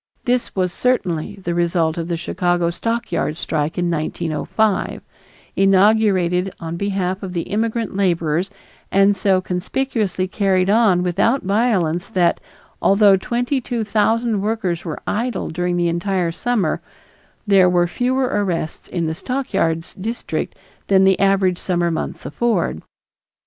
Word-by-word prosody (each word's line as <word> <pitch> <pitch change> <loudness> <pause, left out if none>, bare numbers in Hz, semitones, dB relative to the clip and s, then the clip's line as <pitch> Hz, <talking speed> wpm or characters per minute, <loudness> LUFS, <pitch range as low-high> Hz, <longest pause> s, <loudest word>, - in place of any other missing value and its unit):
This 250 0 0
was 185 -2 0
certainly 185 -11 0
the 180 -3 -4
result 170 -2 +1
of 165 -1 -4
the 170 -1 -2
Chicago 175 0 0
stockyard 230 -5 -2
strike 155 -2 -2
in 175 -1 0
1905, 170 +6 -1 0.5
inaugurated 195 -2 +3
on 165 0 -5
behalf 190 0 -2
of 190 -3 -6
the 170 -2 -1
immigrant 225 0 -2
laborers 175 -2 +1 0.4
and 195 +1 +4
so 190 -1 +2
conspicuously 190 +1 -2
carried 190 -1 +1
on 205 -5 +4
without 200 +9 +1
violence 190 -5 +1
that, 175 -2 +2 0.4
although 200 0 +5
twenty 245 +7 -1
two 235 -1 -2
thousand 220 0 +1
workers 200 -5 -1
were 160 -4 -5
idle 235 -1 -2
during 175 +1 -1
the 175 0 +1
entire 175 +1 0
summer, 200 -2 -1 0.6
there 195 -3 +5
were 175 -1 +3
fewer 250 +8 0
arrests 195 -9 -2
in 170 -2 -2
the 160 - -1
stockyards 165 -8 -2
district 225 +5 -4 0.3
than 190 -1 +4
the 190 -1 +4
average 195 -2 +2
summer 175 -2 0
months 160 - -4
afford. 215 - -1
190 Hz, 135 wpm, -20 LUFS, 175-215 Hz, 0.6 s, although